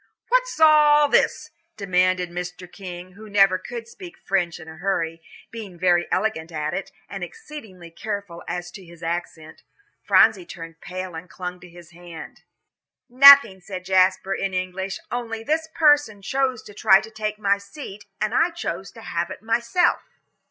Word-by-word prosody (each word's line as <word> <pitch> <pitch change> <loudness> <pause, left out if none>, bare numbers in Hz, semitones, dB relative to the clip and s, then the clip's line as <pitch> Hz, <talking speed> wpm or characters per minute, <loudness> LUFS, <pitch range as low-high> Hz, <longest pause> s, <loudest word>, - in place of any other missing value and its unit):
"What's - - +1
all 300 -2 +6
this?" 305 +2 +1 0.3
demanded 185 -2 +1
Mr. 180 +1 -6
King, 180 -1 -9
who 215 +3 -13
never 195 -2 +4
could 235 +3 -8
speak 350 +8 -12
French 180 -4 -1
in 160 - -12
a 160 0 -11
hurry, 165 -3 -2 0.3
being 210 -6 -9
very 175 0 +2
elegant 185 -5 -1
at 155 -1 -3
it, - - -4 0.2
and - - -7
exceedingly 225 - -10
careful 200 -2 -6
as 175 0 -5
to 195 - -11
his 170 0 -15
accent. 165 -2 -5 0.4
Phronsie 220 -5 +4
turned 165 -1 -10
pale 185 -1 -6
and 165 +3 -9
clung 180 -1 -7
to 180 - -14
his 175 -1 -15
hand. 170 -1 -11 0.7
"Nothing," 270 -7 +8
said 185 0 -8
Jasper, 190 +1 +2
in 195 -1 -3
English, 185 +1 -3
"only 225 -2 -4
this 320 +4 -1
person 290 -10 +3
chose 260 +1 -1
to 205 - -13
try 190 -1 +5
to 220 - -10
take 215 -1 -4
my 200 -1 +1
seat, 200 0 -10
and 215 +1 -1
I 330 +7 +3
chose 340 0 -5
to - - -12
have - - -3
it - - -9
myself." 235 +10 +1
195 Hz, 165 wpm, -23 LUFS, 175-230 Hz, 0.7 s, Nothing